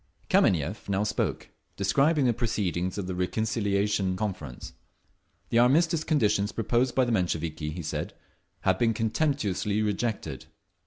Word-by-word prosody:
Kameniev 90 +5 +2
now 100 +1 +1
spoke, 105 - -2 0.3
describing 140 +9 +2
the 120 - +3
proceedings 100 -6 -1
of 100 - -2
the 95 - -3
reconciliation 100 0 0
conference. 90 - -5 0.8
The 115 - +3
armistice 155 +6 +3
conditions 105 -10 +1
proposed 120 +3 0
by 130 - +4
the 120 - -1
Mensheviki, 80 -6 -1
he 85 +3 -5
said, 75 - -4 0.5
had - - +2
been 115 -2 +2
contemptuously 110 - 0
rejected. 105 +2 -2
105 Hz, 125 wpm, -27 LUFS, 95-120 Hz, 0.8 s, by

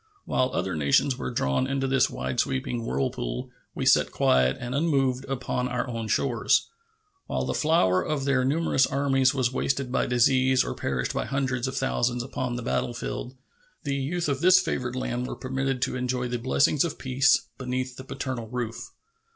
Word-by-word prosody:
While 130 - +1
other 95 -8 -1
nations 75 - +2
were - - -4
drawn 115 - 0
into 135 0 -1
this 135 -1 +3
wide 65 +1 -3
sweeping 115 - -1
whirlpool, 60 - -3 0.2
we - - -2
sat - - +5
quiet 65 0 +3
and 125 0 -5
unmoved 135 -4 +1
upon 125 -1 -2
our 125 +2 -2
own 115 -2 -4
shores. - - +1 0.6
While - - -1
the - - -1
flower 150 - +3
of 150 -3 -2
their 135 -2 +2
numerous 140 -1 +2
armies 135 -1 +2
was 130 -2 +1
wasted 135 -1 -1
by - - +1
disease 130 +1 +3
or - - -3
perished 65 -2 -2
by - - -1
hundreds 130 -2 -1
of 130 0 -4
thousands 120 -2 0
upon 125 -1 -3
the 120 - -4
battlefield, 120 +2 -3 0.5
the 140 - -2
youth 155 +6 -2
of 140 -1 -1
this 185 +1 +7
favored 125 -9 -2
land 125 -1 -2
were - - -5
permitted 130 0 -2
to - - -1
enjoy 125 0 -1
the 120 0 -3
blessings 130 +4 +2
of 170 - -3
peace 135 0 +2
beneath 130 0 -3
the 130 - -9
paternal 130 -3 -5
roof. 120 0 -5
130 Hz, 175 wpm, -26 LUFS, 120-135 Hz, 0.6 s, this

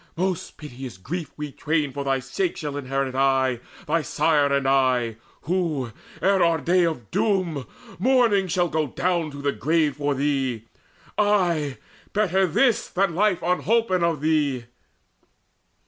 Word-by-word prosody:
Most 185 0 -2
piteous 130 -7 -8
grief 160 - -5
We 150 -1 -5
twain 150 0 -1
for 140 +1 -4
thy 135 -1 +1
sake 150 +8 -2
shall 150 -3 -4
inherit 135 -1 -2
aye, 130 -2 +2 0.3
Thy 165 +1 +1
sire 145 0 +2
and 140 -1 +1
I, 130 -4 +2 0.3
who, 160 -8 -1 0.3
ere 195 0 +3
our 170 -1 +3
day 175 +3 +2
of 120 -11 -5
doom, 180 - 0 0.3
Mourning 230 -4 +3
shall 175 0 +1
go 155 -2 -1
down 170 +3 -1
to 140 -1 -9
the 140 - +2
grave 155 -2 +1
for 145 -1 0
thee 135 -5 -1 0.5
Ay, 175 -9 +2 0.4
better 190 -2 +2
this 240 - +2
than 190 -1 +1
life 195 0 +1
unholpen 185 +1 +1
of 165 -4 0
thee!" 145 -6 +1
155 Hz, 145 wpm, -24 LUFS, 135-180 Hz, 0.5 s, ere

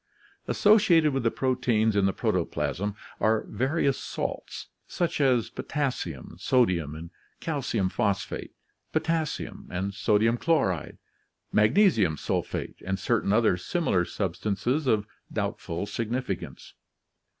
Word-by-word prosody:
Associated 175 -8 +5
with 135 - 0
the 115 - +2
proteins 120 -4 +1
in 100 -1 +3
the - - +2
protoplasm 100 +2 -1 0.2
are 110 0 +2
various 140 +1 0
salts, - - -5 0.2
such 170 -4 -1
as 125 -5 +3
potassium, 130 - -3
sodium, 90 - +2
and 85 +2 -8 0.3
calcium 130 - -1
phosphate, 100 -1 -2 0.4
potassium 160 -1 -2
and 95 +2 -3
sodium 110 +3 +2
chloride, 115 - 0 0.5
magnesium 110 - +4
sulphate, - - -3
and 95 0 -1
certain 100 +1 +1
other 110 -4 +4
similar 95 - 0
substances 100 - -1
of 105 -4 +2 0.3
doubtful 85 +4 -3
significance. 115 +5 -4
110 Hz, 105 wpm, -27 LUFS, 95-135 Hz, 0.5 s, Associated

